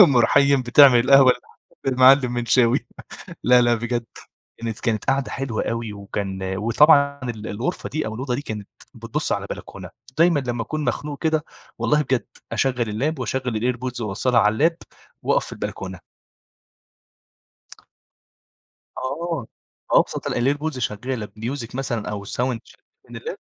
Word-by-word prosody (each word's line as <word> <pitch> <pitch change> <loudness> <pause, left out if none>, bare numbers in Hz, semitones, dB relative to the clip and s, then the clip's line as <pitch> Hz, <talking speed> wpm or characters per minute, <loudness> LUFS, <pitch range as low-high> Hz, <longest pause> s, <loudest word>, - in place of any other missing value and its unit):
أم 145 -10 +7
رحيم 140 +3 +4
بتعمل 125 0 +7
القهوة 130 +1 +6
للحاج 125 - -16 0.3
للمعلم 130 0 +6
منشاوي. 120 0 +3 0.6
لا، 125 0 +6
لا، 120 0 +3
بجد 120 0 -2 0.5
كانت 115 - -5
كانت 110 - -4
كانت 110 -4 -1
قعدة 135 0 0
حلوة 130 -5 -3
أوي 115 -2 -3
وكان 100 -1 -5
وطبعًا 140 +6 +4
ال 110 -3 -5
الغرفة 120 - -3
دي 155 -3 -3
أو 110 - -4
الأوضة 125 +1 -3
دي 140 - -3
كانت 105 -6 -6 0.3
بتبص - - -3
على - - -2
بلكونة، - - -8 0.3
دايمًا 165 -3 +4
لما 120 -2 -3
أكون 155 +5 -4
مخنوق 145 +1 -3
كده 155 -1 +1 0.3
والله 150 0 +2
بجد 130 -5 -1 0.3
أشغّل 125 -4 0
اللاب 135 +8 -2
وأشغّل 125 -2 -2
الAirPods 125 0 -2
وأوصّلها 115 +3 +1
على 105 0 +3
اللاب 165 +8 +2 0.5
وأقف - - +1
في - - -9
البلكونة. 95 -2 -6 3.0
آه، 145 0 -3 0.4
أبسط - - +2
ال - - -1 0.2
الAirPods 150 -2 -4
شغالة 115 +1 -3
بmusic 115 +4 -6
مثلًا 120 -5 -3
أو 100 -1 -5
sound - - -9 0.3
شغالة - - -21 0.3
من - - -10
اللاب. - - -6
125 Hz, 145 wpm, -22 LUFS, 115-140 Hz, 3.0 s, أم